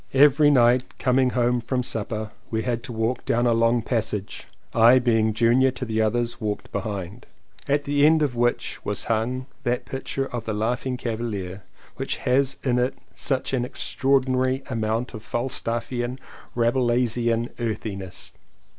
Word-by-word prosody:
Every 145 +1 +6
night 125 -2 +3
coming 130 0 +2
from 125 0 0
supper 110 -2 -3 0.2
we 110 -1 -1
had 120 -2 -1
to - - -6
walk 115 +2 -1
down 120 +1 +1
a 120 - +4
long 115 0 +2
passage 105 -5 -3 0.3
(I 115 +2 +7
being 115 -3 +2
junior 120 +4 +4
to 130 0 -5
the 110 -1 0
others 120 +2 0
walked 105 -1 -3
behind) 100 +1 -5 0.4
at 145 +1 +2
the 145 0 +1
end 155 +1 +5
of 135 -5 -1
which 120 0 0
was - - -2
hung 120 +3 -1 0.2
that 120 +1 -1
picture 135 0 -3
of 120 -4 -5
the 110 - -2
Laugh 115 +5 -1
ing 125 -1 -2
Cavalier 110 -6 -4 0.4
which - - -2
has 135 +2 +2
in 125 -2 +2
it 125 +1 0 0.2
such 135 -1 -1
an 125 -2 +1
extra 135 +1 -2
ordinary 130 0 +2
amount 115 +2 -1
of 110 - -7
Falstaffian, 120 +1 -2 0.4
Rabelaisian 120 -1 +1
earthiness. 100 -5 -5
120 Hz, 155 wpm, -24 LUFS, 110-130 Hz, 0.4 s, I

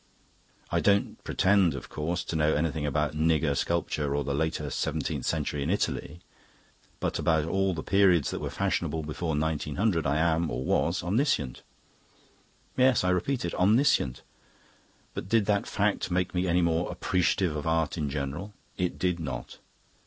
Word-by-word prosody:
I - - +2
don't 100 0 +1
pretend, 95 -3 +3
of - - -8
course, 85 +4 -2
to - - -5
know 80 0 +2
anything 75 -1 -1
about 75 +1 0
nigger 80 -1 +2
sculpture 75 -3 -1
or 75 - 0
the 70 - -2
later 75 0 -1
seventeenth - - -2
century 75 -2 -1
in 70 - -1
Italy; 85 -4 -2 0.8
but - - -2
about 80 -2 +2
all 95 +2 0
the 75 - -5
periods 95 -6 +3
that - - -3
were - - -3
fashionable 80 -1 -1
before 80 +1 -3
1900 80 +3 0
I 70 +2 +1
am, 80 0 +2
or 65 - -3
was, 85 +2 +1
omniscient. 90 - 0 1.1
Yes, 130 -4 +4
I 90 - +2
repeat 105 +6 0
it, 85 - -3
omniscient. 100 - +2 0.9
But 95 - -6
did 115 -2 +3
that 100 -1 +1
fact 105 -1 0
make 90 0 0
me 90 +1 0
any 90 +1 +2
more 85 +1 +1
appreciative 90 -2 0
of 75 +1 -4
art 80 -2 +1
in 75 -4 -2
general? 75 +9 -4 0.2
It 90 -2 -1
did 90 -2 0
not. 80 - -6
85 Hz, 160 wpm, -28 LUFS, 75-95 Hz, 1.1 s, Yes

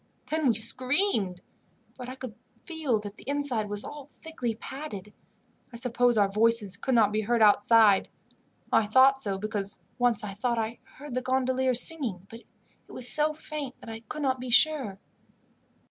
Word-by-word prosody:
Then 315 -2 0
we 235 - +3
screamed; 230 - +3 0.5
but 250 -1 -8
I 255 - -7
could 255 -4 -8 0.3
feel 315 -9 -1
that 205 0 -9
the - - -14
inside 275 -7 -1
was 205 0 -2
all 290 -2 -9
thickly 280 -8 -6
padded. 220 -6 -8 0.6
I - - -11
suppose 245 0 +1
our 205 -1 +4
voices 210 -1 +1
could 260 +6 -2
not 215 -3 +4
be 215 +1 0
heard 230 +1 +1
outside. 210 -1 +4 0.6
I 215 - +3
thought 265 +4 +4
so, 200 -5 -2
because 205 -1 -4 0.2
once 240 -4 +1
I 200 -2 -5
thought 235 +4 -2
I 225 +1 -3 0.2
heard 285 -1 -9
the 255 - -1
gondoliers 255 -1 +1
singing, 240 - +1
but 230 - -10 0.5
it - - -16
was 250 - -5
so 300 +4 0
faint 305 -3 -7
that 225 - -10
I 225 - -7
could 290 +7 -7
not 260 -2 0
be 255 0 -6
sure. 250 -5 +3
240 Hz, 175 wpm, -27 LUFS, 215-265 Hz, 0.6 s, our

